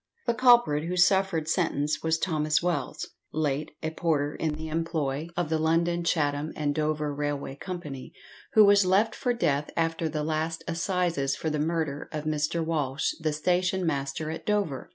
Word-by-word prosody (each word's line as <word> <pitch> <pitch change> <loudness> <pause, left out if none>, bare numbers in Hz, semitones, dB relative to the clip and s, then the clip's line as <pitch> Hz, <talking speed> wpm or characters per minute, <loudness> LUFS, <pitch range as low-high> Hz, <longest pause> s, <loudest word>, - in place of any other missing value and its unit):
The 235 - +2
culprit 235 - +4
who 180 +2 -2
suffered 180 -3 +3
sentence 155 -3 0
was 160 0 +1
Thomas 155 -2 0
Wells, 175 -1 -2 0.2
late 150 -1 -1
a 160 - -1
porter 150 -3 0
in 155 -2 -2
the 160 +1 -6
employ 155 -2 -2
of 175 -3 0
the 160 -1 +1
London, 170 +2 +1
Chatham, 150 -2 0
and 145 -1 0
Dover 150 -1 -1
Railway 145 -1 -3
Company, 150 -5 -7 0.4
who 215 -3 +8
was 200 0 +6
left 195 +5 +3
for 250 -3 -1
death 150 -11 0
after 165 0 0
the 150 -1 -2
last 160 +1 -2
assizes 170 -5 0
for 160 - -3
the 150 - -1
murder 155 -2 -2
of 155 -2 -4
Mr. 155 +2 -1
Walsh, 150 -3 0
the 160 -1 0
station 180 +4 +1
master 145 0 -2
at 160 - -6
Dover. 200 -11 -1
160 Hz, 170 wpm, -27 LUFS, 150-175 Hz, 0.4 s, who